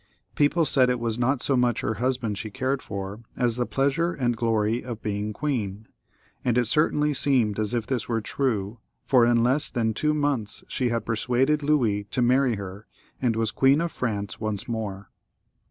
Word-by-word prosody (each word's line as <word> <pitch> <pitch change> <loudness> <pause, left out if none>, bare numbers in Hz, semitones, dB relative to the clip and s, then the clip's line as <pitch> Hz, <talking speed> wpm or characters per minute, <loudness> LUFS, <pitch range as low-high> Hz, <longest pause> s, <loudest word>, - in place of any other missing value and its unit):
People 150 +3 +2
said 130 -4 +4
it 125 -1 0
was 115 0 -2
not 130 +1 +1
so 135 - +2
much 120 -2 +2
her 110 - -1
husband 125 -4 0
she 110 +2 -5
cared 130 +4 -1
for 100 +1 -6 0.2
as 120 -2 +2
the 125 0 -1
pleasure 140 +6 +1
and 120 -5 0
glory 115 0 0
of 120 -3 -7
being 105 0 -2
queen; 110 -5 -3 0.6
and 120 -1 +1
it 125 - +3
certainly 150 +3 +2
seemed 125 -7 +1
as 110 +3 0
if 115 -2 -1
this 130 -3 -3
were 115 -1 +1
true, 110 -3 -2 0.2
for 125 -3 +4
in 120 -1 +3
less 135 +5 +2
than 115 -3 0
two 150 +7 0
months 140 -8 -1
she 125 -2 -1
had 115 -1 -2
persuaded 125 +6 +1
Louis 120 -9 +1
to 120 +5 -1
marry 125 0 +3
her, 100 +1 -8 0.3
and 120 -4 +1
was 115 0 0
Queen 135 +2 +4
of 170 0 -1
France 100 -8 -3
once 110 -3 -3
more. 100 -4 -5
120 Hz, 185 wpm, -25 LUFS, 110-135 Hz, 0.6 s, said